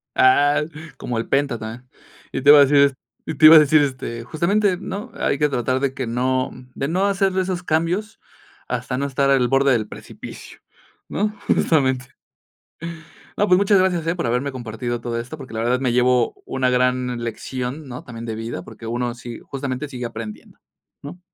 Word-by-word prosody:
Ah, 145 +3 +4 0.3
como 120 - -4
el 115 - -2
penta 135 -3 +1
tambien. 115 +3 -8 0.4
Y - - -3
te 145 - +4
iba 145 0 +10
a - - +9
decir, 140 +1 +5
est 140 -1 +5 0.3
y 160 - -4
te 155 - +5
iba 160 +1 +11
a - - +10
decir, 150 +1 +5
este, 130 -4 -3
justamente, 180 - +1
¿no? 205 +7 -6
Hay 140 - 0
que 150 +1 +2
tratar 130 0 0
de 135 -1 -1
que 130 -3 -4
no, 130 +2 0 0.2
de 135 - -3
no 185 +5 +1
hacerle 195 -1 +1
esos 185 -1 -2
cambios 175 +6 -1 0.5
hasta 125 +1 -3
no 140 - -1
estar 140 0 +1
al 130 -3 +4
borde 135 +1 +3
del 110 -4 +1
precipicio, - - -11 0.5
¿no? 210 +1 0 0.2
Justamente. 130 -5 +2 1.3
No, 205 - +2
pues 180 - +5
muchas 200 0 +4
gracias, 180 -3 +1
eh, 165 - +1
por 175 - -3
haberme 125 +4 0
compartido 120 -1 -4
todo 115 0 -3
esto, 125 +7 -7
porque, 135 -4 -10
la 110 - -3
verdad 125 +2 +1
me 130 -2 0
llevo 125 0 +2
una 130 -1 0
gran 125 -1 0
lección, 130 +5 -5
¿no? 125 0 -8
También 115 -1 -8
de 110 -1 -4
vida, 115 -5 -5
porque 115 +5 -10
uno 120 +1 -2
sí, 120 -1 -9
justamente 135 +1 -5
sigue 125 -3 -5
aprendiendo, 115 -2 -8 0.4
¿no? 145 +6 -9
130 Hz, 190 wpm, -21 LUFS, 120-155 Hz, 1.3 s, iba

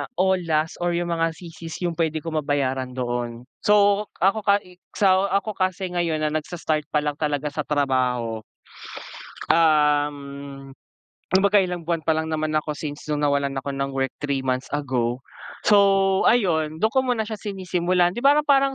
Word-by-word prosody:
all 190 -1 +2
last 155 0 0
or 175 0 0
yung 175 0 -2
mga 165 -1 0
CC's 165 -1 -9
yung 175 -1 0
pwede 160 -2 0
ko 165 - -4
mabayaran 135 -4 -1
doon. 120 -1 -3 0.2
So, 205 0 +4
ako, 195 +4 +3
ka 200 0 +4
eh, 180 0 -18 0.2
sa 190 -1 +3
ako 200 +3 0
kasi 185 0 -1
ngayon 170 -3 -1
na, 155 - +1
nagsa-start 155 -1 -2
pa 150 -1 0
lang 150 -1 -2
talaga 150 -1 -1
sa 150 - -1
trabaho, 125 -5 0 1.1
um, 145 -3 +1 0.6
kumbaga 200 +2 +4
ilang 180 -3 -4
buwan 165 -1 -1
pa 160 - 0
lang 160 0 +1
naman 155 -1 -2
ako, 150 0 -4
since 145 -1 -7
no'ng 150 -1 -1
nawalan 140 -1 0
ako 135 +1 -4
ng 135 0 -2
work 135 0 0
3 140 -2 -2
months 130 0 -1
ago, 125 -4 -1 0.4
so 210 -2 +5 0.5
ayun, 160 -9 +2
do'n 220 - +3
ko 265 +1 +1
muna 245 -3 +1
siya 215 0 -6
sinisimulan, 180 -3 0
'di 185 - -7
ba, 275 +4 +5
ra 300 - +3
parang, 275 -2 +3
160 Hz, 175 wpm, -23 LUFS, 140-185 Hz, 1.1 s, so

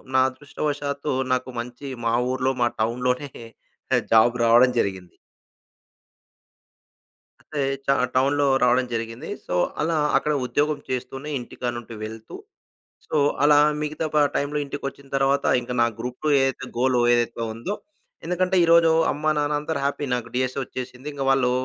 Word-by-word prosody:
నా 130 - +6
అదృష్టవశాత్తు 145 +1 -3 0.2
నాకు 130 0 -1
మంచి 125 +4 -7 0.2
మా 115 - +2 0.2
ఊర్లో, 130 0 0
మా 120 - +4
టౌన్‌లోనే 125 +4 -1 0.8
జాబ్ 115 +2 +5
రావడం 120 +2 +6
జరిగింది. 95 -4 -3 2.3
అంటే 150 -2 -5 0.3
చ - - -30 0.3
టౌన్‌లో 140 +2 +2 0.2
రావడం 125 +1 +3
జరిగింది. 115 +5 -5 0.2
సో, - - -3 0.3
అలా 160 +2 +1 0.2
అక్కడ 150 - +1
ఉద్యోగం 150 +3 0
చేస్తూనే 135 +3 -4
ఇంటికాడ్నుండి 120 -1 -6
వెళ్తూ, 110 0 -8 0.7
సో - - -2 0.3
అలా 145 0 +6 0.2
మిగతా 150 +1 -2
ప - - +4 0.2
టైంలో 145 +1 -1
ఇంటికొచ్చిన 140 0 -7
తరువాత, 135 +1 +2 0.2
ఇంక 120 - -10
నా - - +5
గ్రూప్-2 125 +5 -4
ఏదైతే 135 -1 -1
గోల్ 130 0 +2 0.2
ఏదైతే 120 -1 -1
ఉందో 120 - -4 0.5
ఎందుకంటే 180 +2 0
ఈరోజు 165 0 +6 0.2
అమ్మా 155 +2 0
నాన్న 150 0 +1
అందరూ 150 0 -3
హ్యాపీ 140 +1 -1
నాకు 120 -2 -2
డీఎస్సీ 130 +1 -1
వచ్చేసింది. 130 +1 -8
ఇంగ 140 -1 -4
వాళ్ళు 135 -2 +3
130 Hz, 135 wpm, -24 LUFS, 120-145 Hz, 2.3 s, నా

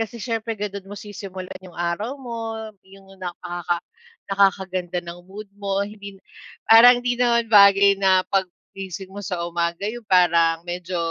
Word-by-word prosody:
kasi 225 +1 -4
siyempre 225 0 -3
ganon 200 -1 -6
mo 205 - -8
sisimulan 190 -3 -8
yung 185 -2 -14
araw 175 +10 -2
mo, 230 -4 -6 0.3
yung 195 0 -16 0.2
nakaka 175 -1 -4 0.5
nakakaganda 185 -3 0
ng 175 +1 -10
mood 205 +3 -8 0.2
mo, 200 0 -1
hindi 200 -1 -10 0.5
parang 245 +2 +7
hindi 245 0 -1
naman 235 -2 +2
bagay 200 -1 +6
na 190 -1 +4
'pag 190 -1 +2 0.2
gising 190 0 -8
mo 205 - -7
sa 180 -4 -4
umaga, 170 +1 -2
yung 240 -2 -10
parang 170 -2 +3
medyo 175 +1 -5
195 Hz, 150 wpm, -22 LUFS, 180-210 Hz, 0.5 s, parang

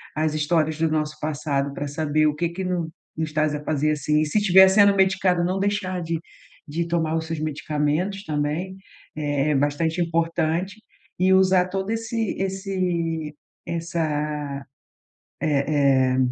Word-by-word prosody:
às 155 0 0
histórias 155 0 +1
do 165 0 +1
nosso 155 -1 -1
passado 140 -2 -2
para 145 +1 -4
saber 155 +1 0
o 150 - 0
que 170 +2 -1
que 190 +3 -5
no 175 -3 -2 0.3
nos 160 0 -1
está 155 0 0
a 150 -1 -3
fazer 155 0 +1
assim 150 +1 +1
e - - +1
se 155 +8 +1
tiver 190 -1 +7
sendo 200 +1 +5
medicado, 190 -2 +2
não 185 +2 0
deixar 190 -2 -1
de 165 -1 -2 0.5
de 165 +3 -2
tomar 165 -2 0
os 160 - -3
seus 160 -1 -4
medicamentos 155 +5 -1
também 155 +4 -2 0.4
é 145 -1 0
é - - +2
bastante 145 +4 0
importante 165 +2 0 0.4
e 185 +1 +4
usar 190 -1 +4
todo 190 +1 -3
esse 225 -1 -2
esse 180 -5 -2 0.3
essa 150 -4 -3 0.8
eh 140 -3 +2
eh, - - 0
160 Hz, 155 wpm, -23 LUFS, 150-185 Hz, 0.8 s, tiver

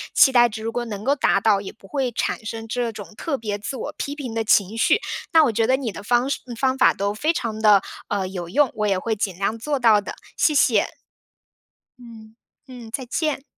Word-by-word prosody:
期 265 - +7
待 240 -2 +5
值 220 0 -7
如 225 - -2
果 240 +1 -2
能 210 -3 -6
够 275 +4 +2
达 230 -7 +2
到， 200 -1 +2
也 195 - -7
不 195 - -19
会 265 +1 -1
产 230 - -2
生 225 +1 -6
这 240 0 -2
种 215 0 -10
特 300 +2 -3
别 210 -3 -4
自 235 +6 -5
我 - - -5
批 285 - -4
评 265 -6 -6
的 225 0 -1
情 210 -1 +2
绪。 230 - +3 0.3
那 325 -2 +6
我 270 - +2
觉 225 +1 +1
得 260 +1 +3
你 255 -5 -3
的 205 - -9
方 240 +4 +1
式 280 - -2
嗯， 240 - -7
方 260 +2 +1
法 265 - +5
都 200 +1 -1
非 300 +10 0
常 225 -9 -4
地， 205 -3 +5 0.2
呃， 200 -2 -1
有 180 -2 -6
用， 290 +8 +2
我 215 -1 -1
也 195 -2 +1
会 220 +4 -2
尽 195 -4 -3
量 200 +3 -1
做 285 +5 -1
到 225 -5 +4
的， - - -7 0.2
谢 305 - +3
谢。 230 -6 +3 1.1
嗯， 225 -2 -13 0.3
嗯， 245 -3 -10
再 260 +1 -4
见。 290 +2 -2
225 Hz, 250 characters per minute, -22 LUFS, 210-260 Hz, 1.1 s, 期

